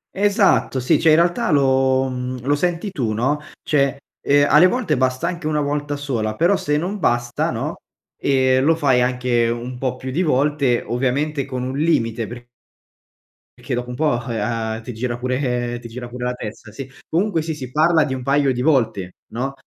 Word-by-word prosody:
Esatto, 200 - +2
sì. 125 - +3
Cioè, 160 -1 +4
in - - +7
realtà 175 +6 +2
lo 130 -2 +3
mhmm, 125 0 -4
lo 145 - +2
senti 175 +5 -1
tu, 125 - -2
no, 135 +7 0 0.2
cioè, 140 -2 +1 0.2
ehm, 145 0 +3
alle 155 +5 +7
volte 205 - 0
basta 130 +5 0
anche 170 -3 -5
1 150 -1 0
volta 145 0 -2
sola, 120 -7 -2
però 175 +5 +3
se 150 - -1
non 185 +7 -2
basta 120 -4 0
no, - - -3 0.4
ehm, 130 -1 +2
lo 165 +2 +4
fai 135 -6 +2
anche 125 -2 +1
un 120 +2 -4
po' 125 0 -2
più 130 0 -6
di 165 - 0
volte, 140 -5 +1
ovviamente 135 +4 -1
con 125 -1 -4
un 130 +2 -3
limite 115 -8 +1
per 120 +2 -9 1.1
perché - - -5
dopo 125 0 -4
un 125 - -5
po', 155 - 0 0.2
uhm, 110 0 -2
ti 125 +2 -7
gira 120 +2 -3
pure 125 -1 -1
ti 120 - -8
gira 120 +1 -7
pure 125 +1 -7
la 125 - -1
testa, 110 -2 -8
sì. 135 +3 -8 0.2
Comunque 175 0 +1
sì, 160 +1 -3
si 135 -5 -7
parla 160 +2 +3
di 135 - -3
un 130 -1 -5
paio 140 0 +2
di 125 - -3
volte, 110 - +1 0.2
no, 130 +4 -2
130 Hz, 190 wpm, -20 LUFS, 125-150 Hz, 1.1 s, in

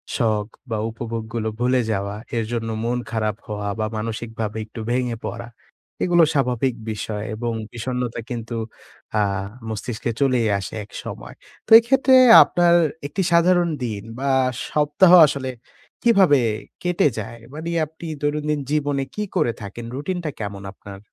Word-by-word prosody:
শখ 110 -4 +1 0.2
বা 110 - -1
উপভোগগুলো 115 0 -4
ভুলে 125 +1 +2
যাওয়া। 100 0 -2 0.2
এর 115 - +1
জন্য 115 -1 -2
মন 120 +1 0
খারাপ 110 -2 -1
হওয়া 105 -1 -4
বা 110 - +1
মানসিকভাবে 110 0 -4
একটু 110 +1 -10
ভেঙে 125 -1 0
পড়া। - - -5 0.6
এগুলা 175 -2 +5
স্বাভাবিক 130 -2 +1 0.2
বিষয় 105 0 -4
এবং 120 +1 -2 0.2
বিষন্নতা 125 0 -3
কিন্তু 115 -1 -5 0.7
আ - - +4 0.5
মস্তিষ্কে 110 +2 -3
চলেই 130 -5 +2
আসে 95 - -7
একসময়। 105 - -8 0.3
তো - - -16
এক্ষেত্রে 265 +2 +3 0.3
আপনার 175 -1 +3 0.3
একটি 190 - -3
সাধারণ 175 0 +4
দিন 105 -4 -3 0.2
বা 140 - -2 0.4
সপ্তাহ 150 +4 +4
আসলে 135 -2 -2 0.5
কিভাবে 195 -11 +5 0.5
কেটে 180 -3 +2
যায়? 115 +3 -7
মানে 160 +2 -5 0.2
আপনি 160 +2 -12 0.2
দৈনন্দিন 150 0 0
জীবনে 145 -2 0
কি 210 - -2
করে 120 - +2
থাকেন, 110 +4 -7
রুটিনটা 170 +2 -3
কেমন 100 -1 -5
আপনার? 100 0 -11
120 Hz, 135 wpm, -22 LUFS, 110-150 Hz, 0.7 s, এগুলা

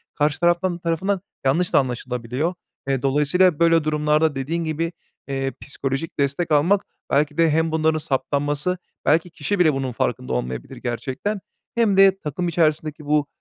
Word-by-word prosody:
karşı 150 0 +1
taraftan 175 +1 +2
tarafından 175 +3 -1 0.2
yanlış 165 +7 +2
da - - +7
anlaşılabiliyor. 125 +4 -2 0.3
Eee, 135 -2 0
dolayısıyla, 150 +5 +3
böyle, 165 -1 +4
durumlarda 150 0 +2
dediğin 155 +6 -2
gibi, 165 +1 -2 0.4
eee, 135 -1 -2
psikolojik 135 +3 -4
destek 140 +4 0
almak 170 +7 +3 0.3
belki 150 +2 +1
de 165 -1 +4
hem 160 +1 +1
bunların 160 0 +2
saptanması 145 +3 0 0.3
belki 160 +4 +3
kişi 170 +5 -2
bile 160 -4 +5
bunun 135 -1 -2
farkında 65 - -2
olmayabilir 60 0 -4
gerçekten 135 - -3 0.3
hem 225 -5 +2
de 195 0 +6
takım 160 +3 -3
içerisindeki 155 -2 0
bu, 150 0 +2
155 Hz, 150 wpm, -22 LUFS, 140-170 Hz, 0.4 s, da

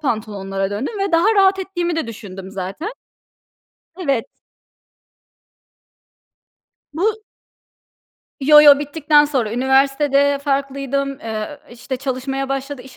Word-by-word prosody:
pantolonlara 200 -7 -3
döndüm 275 - -4
ve 390 -2 -2
daha 380 +7 +4
rahat 390 -1 +4
ettiğimi 350 -3 -3
de 320 - -2
düşündüm 195 -4 -9
zaten. 195 - -5 1.1
Evet. 275 -10 -1 2.7
Bu 430 +7 -1 1.2
Yo, 300 +2 +7
yo, 290 -2 +8
bittikten 295 0 +3
sonra. 255 -7 -1
Üniversitede 275 +2 +2
farklıydım, 275 -1 -2
eee, - - -10
ööö, 215 +7 -5
işte 250 +2 -6
çalışmaya 270 +1 -3
başladı, 275 -1 -4
iş 260 0 -15
275 Hz, 105 wpm, -19 LUFS, 245-300 Hz, 2.7 s, yo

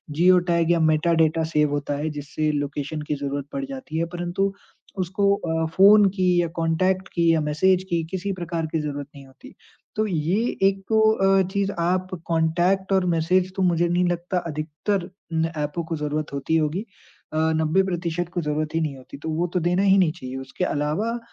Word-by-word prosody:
Geo 180 +3 +5
tag 170 0 +2
या 170 - +3
metadata 160 0 +2
save 150 -1 +3
होता 145 0 -2
है 155 +2 -2
जिससे 150 +2 -2
लोकेशन 145 +1 -3
की 150 - +1
ज़रूरत 140 0 -4
पड़ 275 - -3
जाती 265 - -6
है 165 - +1
परंतु 175 +3 -1 0.5
उसको 200 +2 +2
अ, 160 -3 -2
फ़ोन 205 +2 +7
की 185 -2 +1 0.2
या 170 - 0
कॉन्टैक्ट 185 +4 +1
की 170 -1 +3
या 160 - +2
मैसेज 180 +5 +2
की 170 -1 0
किसी 190 +1 -2
प्रकार 170 -2 -3
की - - +2
ज़रूरत 145 -1 -4
नहीं 140 -1 -11
होती। 130 - -15 0.4
तो 215 - +1
ये 175 +3 0 0.3
एक 195 0 -5
तो 220 -1 +3
अ, 195 -2 +3
चीज़ 200 -1 0
आप 185 +2 0 0.2
कॉन्टैक्ट 175 +4 +1
और 190 -1 +3
मैसेज 180 +3 +1
तो 190 - -2
मुझे 175 -1 +2
नहीं 175 +1 +2
लगता 175 +1 -2
अधिकतर 165 +5 -3 0.2
न 165 0 0
ऐपों 150 +3 -2
को 165 0 -4
ज़रूरत 150 0 -3
होती 140 +3 -1
होगी। 155 +5 0 0.5
अ, - - -2 0.2
90% 175 +1 0
को 175 - -1
ज़रूरत 150 0 -2
ही - - +2
नहीं 150 -3 -2
होती 130 +1 -12
तो - - -3
वो 165 +3 0
तो 180 - +2
देना 180 +3 +1
ही 195 0 +5
नहीं 175 -5 +4
चाहिए। 130 -2 -8
उसके 135 +7 -5
अलावा 180 +11 -1
170 Hz, 190 wpm, -23 LUFS, 155-185 Hz, 0.5 s, फ़ोन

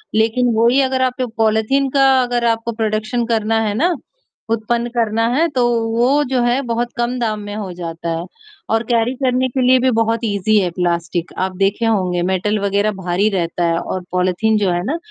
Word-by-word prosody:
लेक़िन 230 +2 +2
वही 235 +5 +4
अगर 260 -1 0
आपके 255 0 0
पॉलिथीन 225 +5 +2
का 275 0 +4 0.2
अगर 245 -1 -1
आपको 230 0 0
प्रोडक्शन 220 +1 -1
करना 225 -1 0
है 215 -2 -1
ना, 340 +9 +1 0.5
उत्पन्न 235 +1 -1
करना 225 -1 +1
है, 325 +4 +3
तो 250 -4 +1 0.3
वो 270 +5 +3
जो 260 -2 +1
है 240 +3 +1
बहुत 240 -1 -2
कम 240 +1 -1
दाम 220 -3 -1
में 205 0 -7
हो 205 -3 -5
जाता 170 -1 -6
है 170 - -5 0.5
और 225 0 +2
कैरी 235 +1 +2
करने 255 0 +2
के 260 +2 -2
लिए 255 0 +5
भी 260 +1 +2
बहुत 225 0 +1
इज़ी 210 0 +1
है 185 -3 0
प्लास्टिक। 170 -1 -2
आप 185 0 -2
देखे 200 +4 +1
होंगे 185 -5 +1
मेटल 205 +3 0
वग़ैरह 200 +1 +1
भारी 190 +1 0
रहता 175 -3 -2
है 165 0 +1
और 185 - -4
पॉलिथीन 185 +4 +1
जो 200 -3 +1
है 175 0 -1
ना, 295 +8 -1
220 Hz, 195 wpm, -18 LUFS, 195-245 Hz, 0.5 s, लिए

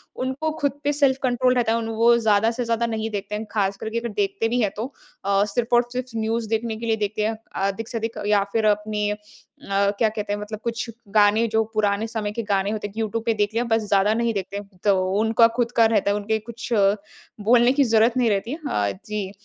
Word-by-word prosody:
उनको 265 +5 -2
खुद 285 -1 +1
पे 290 +1 +1
सेल्फ-कंट्रोल 260 -3 +2
रहता 235 -2 +2
है। - - +2
उन 225 - -4
वो 235 +1 +5
ज़्यादा 220 0 +3
से 245 +1 -3
ज़्यादा 230 0 0
नहीं 220 -1 -2
देखते 205 0 -4
हैं। 215 - -4
खासकर 200 0 -1
के 230 +1 -1
अगर 235 - -4
देखते 205 +2 0
भी 245 0 +1
हैं 205 - +1
तो 220 - -2 0.4
अ, 200 0 +3
सिर्फ़ 230 +3 0
और 240 0 +3
सिर्फ़ 250 -2 -4
न्यूज़ 220 0 -1
देखने 225 0 -1
के 230 - -6
लिए 225 - +2
देखते 210 0 -1
हैं। 220 0 -1 0.3
अधिक 215 +3 -4
से 235 - -3
अधिक 225 +1 -4
या 205 -1 +3
फिर 225 -1 +1
अपनी 210 0 +1
अ, - - -1 0.5
क्या 200 +2 +1
कहते 210 -1 -3
हैं 205 - -3
मतलब 210 0 -6
कुछ 235 +1 -2 0.2
गाने 215 +2 +4
जो 225 0 +2
पुराने 210 0 +1
समय 215 -2 -3
के 230 +1 -4
गाने 200 -1 0
होते 210 -1 -3
हैं 200 - -14
कि 225 - -6
यूट्यूब 225 +1 -2
पे 230 - +2
देख 210 0 0
लिया 235 - +1
बस 225 -1 +1
ज़्यादा 200 +1 +3
नहीं 235 0 0
देखते। 200 0 -4 0.2
तो 200 -2 +4 0.2
उनका 225 +1 +5
खुद 240 -1 0
का 230 - +7
रहता 210 -2 +2
है - - +1
उनके 220 +2 -1
कुछ 235 +2 -8 0.8
बोलने 240 +2 +5
की 280 - +3
ज़रूरत 230 +1 +3
नहीं 240 -3 +3
रहती 205 +3 -1
है, 305 - -4
हाँ 100 -1 0
जी। 210 -3 -4
220 Hz, 235 wpm, -23 LUFS, 205-235 Hz, 0.8 s, का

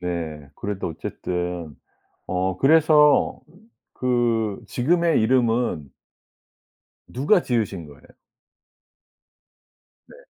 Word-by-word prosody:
네, 80 -5 -5
그래도 100 -2 -4
어쨌든 90 -1 -5 0.5
어 95 0 -1
그래서 150 - +4 0.5
그 120 -4 0
지금의 165 +3 +1
이름은 115 - +1 1.2
누가 145 - +2
지으신 105 -9 -2
거예요? 70 -1 -16 2.1
네. - - -15
110 Hz, 155 characters per minute, -23 LUFS, 90-130 Hz, 2.1 s, 그래서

